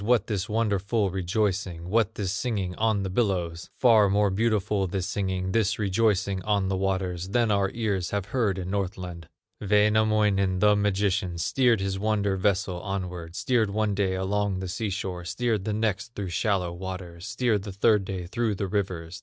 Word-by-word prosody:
What 115 -1 +3
this 105 0 -3
wonderful 105 -1 0
rejoicing, 95 -2 -1
What 110 +2 +1
this 95 -3 -2
singing 105 -4 -2
on 110 -2 +1
the 95 - -2
billows? 90 -6 -1
Far 110 -5 +5
more 100 0 +2
beautiful 105 -1 +1
this 90 0 -2
singing, 95 -1 -2
This 110 -2 +1
rejoicing 100 -1 +1
on 100 -1 0
the 95 - 0
waters, 95 -1 -1
Than 115 +1 +2
our 100 -1 +2
ears 100 -6 -1
have 100 -2 -2
heard 105 -4 0
in 90 0 -4
Northland." 90 -4 -4 0.3
Wainamoinen, 105 -2 +3
the 105 +2 +4
magician, 100 -3 0
Steered 120 +4 +2
his 95 0 -2
wonder 100 -2 +1
vessel 95 -2 0
onward, 90 -4 -5
Steered 115 -2 +1
one 105 0 0
day 95 -2 0
along 100 +1 0
the 95 0 -4
sea 105 +4 -3
shore, 95 -2 -4
Steered 110 +2 -1
the 110 - -1
next 110 +1 -2
through 100 -3 -4
shallow 90 -1 0
waters, 90 0 -7
Steered 120 -4 +1
the 100 +1 -7
third 105 +1 +3
day 95 -2 -5
through 110 +3 -1
the 100 - -2
rivers. 90 -3 -3
100 Hz, 170 wpm, -26 LUFS, 95-105 Hz, 0.3 s, Far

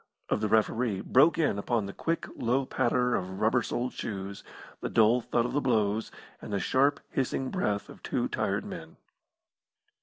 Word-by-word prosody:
of - - +1
the 110 - +1
referee 110 -1 +2
broke 150 +10 +4
in 145 -11 +1
upon 110 0 0
the 100 - -6
quick, 165 0 -2
low 130 +3 +1
patter 125 0 +1
of 95 -1 -2
rubber 115 +3 +3
soled 125 +2 -2
shoes, 100 -2 -5 0.4
the - - -3
dull 115 +2 +4
thud 120 0 0
of 125 - -3
the 145 - +1
blows, 110 -4 +1 0.3
and - - -8
the 100 - 0
sharp, 140 +8 +2
hissing 130 0 -1
breath 105 - -1
of - - -13
two - - -1
tired - - -1
men. - - -8
120 Hz, 175 wpm, -29 LUFS, 105-130 Hz, 0.4 s, broke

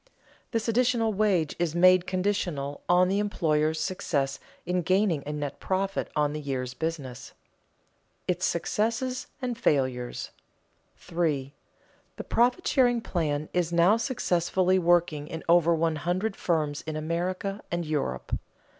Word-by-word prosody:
This 230 -1 -2
additional 230 -1 +2
wage 190 -7 +1
is 170 -2 0
made 185 +1 +5
conditional 180 -7 -1
on 180 +1 +5
the 195 +2 +1
employer's 160 -6 +1
success 140 -7 -1 0.3
in 180 +1 0
gaining 185 -3 +2
a - - -2
net 145 -2 -4
profit 195 +1 -1
on 150 -1 +1
the 150 - -4
year's 130 -3 -3
business. 145 -5 -4
[Sidenote: - - -13 0.9
Its 180 - +1
successes 230 +8 -1 0.2
and 250 -1 -1
failures] 130 - 0 0.7
3. 150 -6 -2 0.6
_The - - -7
profit 245 +9 +2
sharing 245 -3 +3
plan 155 -7 -1
is 175 -2 0
now 170 +5 +5
successfully 185 -6 +1
working 170 -4 +2
in 160 0 -6
over 170 0 +5
one 165 -1 0
hundred 185 +7 -1
firms 155 -4 -1
in 155 - -3
America 180 +5 -2
and 175 -1 -1
Europe. 145 - -2
175 Hz, 135 wpm, -27 LUFS, 150-195 Hz, 0.9 s, made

